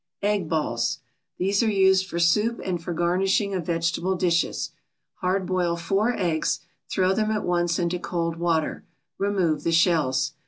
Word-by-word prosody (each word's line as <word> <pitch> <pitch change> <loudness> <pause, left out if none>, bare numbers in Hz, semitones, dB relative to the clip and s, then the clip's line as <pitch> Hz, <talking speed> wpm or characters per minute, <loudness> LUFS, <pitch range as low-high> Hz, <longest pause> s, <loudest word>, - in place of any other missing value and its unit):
EGG 205 -5 0
BALLS 135 -5 0 0.4
These 195 +2 +1
are 230 - +2
used 190 -2 +3
for 170 - -5
soup 210 +7 +2
and 175 -3 -2
for 175 - -4
garnishing 190 +4 +1
of 180 -4 -3
vegetable 170 +2 0
dishes. 170 -2 0 0.5
Hard 185 +1 0
boil 180 -2 0
four 195 +7 +1
eggs, 160 -3 0 0.3
throw 185 0 +2
them 215 +1 0
at 215 -1 -1
once 175 -1 +1
into 175 0 -1
cold 165 -2 -2
water, 165 -2 0 0.4
remove 185 -7 +1
the 165 - +1
shells. 150 -5 +2
175 Hz, 155 wpm, -25 LUFS, 170-195 Hz, 0.5 s, used